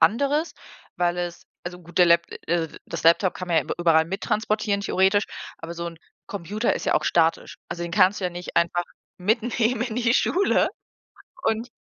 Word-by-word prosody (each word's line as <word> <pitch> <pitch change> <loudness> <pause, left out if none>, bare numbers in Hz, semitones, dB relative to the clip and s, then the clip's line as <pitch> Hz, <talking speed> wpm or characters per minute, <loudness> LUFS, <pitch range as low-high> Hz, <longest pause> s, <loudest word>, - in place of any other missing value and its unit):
anderes, 280 - +2 0.4
weil 175 0 +1
es 175 -1 -4 0.2
also 180 0 -6
gut, 175 -1 -16
der 180 - +7
Lapt 170 0 +4
äh, - - -6
also 165 -2 -1
das - - -5
Laptop 170 +3 +4
kann 185 - -6
man 165 -2 +3
ja - - +2
übe - - -3
überall 165 -2 +4
mittransportieren 210 +2 -1
theoretisch, 195 +1 +2 0.3
aber 165 +1 -7
so 170 0 -4
'n 165 -1 -8 0.3
Computer 205 +4 -1
ist - - -5
ja - - +2
auch - - +1
statisch. 165 -1 +1
Also 170 0 -5
den 170 - -6
kannst 195 +1 +4
du - - -3
ja - - -3
nicht 175 0 -8
einfach 170 +1 +2 0.4
mitnehmen 230 +3 +1
in 240 -3 -3
die 245 -1 +2
Schule 390 +8 +2 0.8
und 225 +3 0
180 Hz, 195 wpm, -24 LUFS, 170-220 Hz, 0.8 s, der